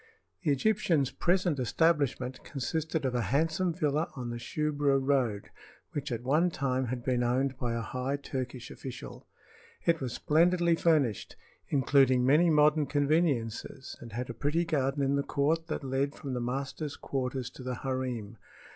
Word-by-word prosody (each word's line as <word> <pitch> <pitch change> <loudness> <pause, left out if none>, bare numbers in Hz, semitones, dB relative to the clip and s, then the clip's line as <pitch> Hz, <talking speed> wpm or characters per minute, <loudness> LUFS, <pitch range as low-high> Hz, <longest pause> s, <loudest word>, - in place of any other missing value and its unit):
The - - -1
Egyptian's 155 -3 +2
present 175 +1 +1
establishment 140 -2 +1
consisted 155 +3 -2
of 130 - 0
a 120 - +1
handsome 160 +6 +1
villa 155 -1 0
on 125 -3 -4
the 120 - -5
Shubra 145 +2 +1
road 130 -7 0 0.4
which 145 -1 -4
at 120 0 -3
one 155 +7 +3
time 130 -4 -1
had 120 0 -4
been 125 -1 +1
owned 130 +2 +1
by 120 -4 -1
a 115 - -1
high 130 +4 -2
Turkish 130 -3 -5
official. 130 -2 -8 0.6
It 165 -2 +2
was 125 -3 -3
splendidly 170 +2 +3
furnished, 150 - +1 0.3
including 135 -2 +4
many 155 +6 +5
modern 150 -1 +4
conveniences, 145 -5 0
and 115 - -9
had 120 +2 -3
a - - -6
pretty 150 +8 0
garden 140 -2 0
in 140 +1 +2
the - - +2
court 150 +4 0
that 155 - -3
led 135 +1 -1
from 135 -3 -5
the 125 - -2
master's 135 +4 -3
quarters 130 -2 -3
to - - -12
the 125 -1 -3
harem. 125 -5 -3
140 Hz, 160 wpm, -30 LUFS, 125-155 Hz, 0.6 s, many